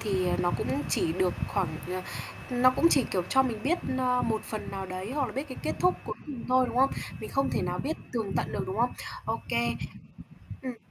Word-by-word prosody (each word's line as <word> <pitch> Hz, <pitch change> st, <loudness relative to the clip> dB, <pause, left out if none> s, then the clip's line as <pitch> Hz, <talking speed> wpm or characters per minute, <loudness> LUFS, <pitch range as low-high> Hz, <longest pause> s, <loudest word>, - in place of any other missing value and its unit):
thì, 190 Hz, -4 st, +1 dB
ờ, -, -, +2 dB
nó 175 Hz, -, +3 dB
cũng 135 Hz, +3 st, -1 dB
chỉ 160 Hz, -, +2 dB
được 180 Hz, +1 st, +2 dB
khoảng, 195 Hz, -4 st, +1 dB, 0.2 s
ờ, 185 Hz, 0 st, -2 dB, 0.5 s
nó 250 Hz, 0 st, +6 dB
cũng 290 Hz, -, +4 dB
chỉ, 275 Hz, -, +5 dB
kiểu, 185 Hz, -, +1 dB
cho 265 Hz, -, +5 dB
mình 230 Hz, -5 st, -2 dB
biết, 335 Hz, +6 st, +2 dB, 0.2 s
ờ, 250 Hz, -1 st, +3 dB
một 220 Hz, -1 st, +1 dB
phần 215 Hz, -, -4 dB
nào 195 Hz, -1 st, -4 dB
đấy 185 Hz, +4 st, -4 dB
hoặc 285 Hz, -3 st, +2 dB
là 220 Hz, -, -6 dB
biết 275 Hz, +5 st, -3 dB
cái 260 Hz, -, -7 dB
kết -, -, 0 dB
thúc 360 Hz, 0 st, +5 dB
cuối -, -, -3 dB
cùng 275 Hz, -6 st, -6 dB
thôi, 255 Hz, 0 st, +5 dB
đúng -, -, -4 dB
không? 270 Hz, +2 st, +6 dB, 0.3 s
Mình -, -, -6 dB
không 275 Hz, 0 st, +2 dB
thể -, -, +1 dB
nào 180 Hz, 0 st, -1 dB
biết 300 Hz, -, -1 dB, 0.2 s
tường 220 Hz, -5 st, -1 dB
tận -, -, 0 dB
được, -, -, -1 dB
đúng 190 Hz, +1 st, -3 dB
không? 240 Hz, +2 st, +3 dB, 0.3 s
Ô -, -, -1 dB
kê. -, -, +2 dB, 0.9 s
Ừm. 255 Hz, -2 st, -4 dB
230 Hz, 240 wpm, -29 LUFS, 185-260 Hz, 0.9 s, nó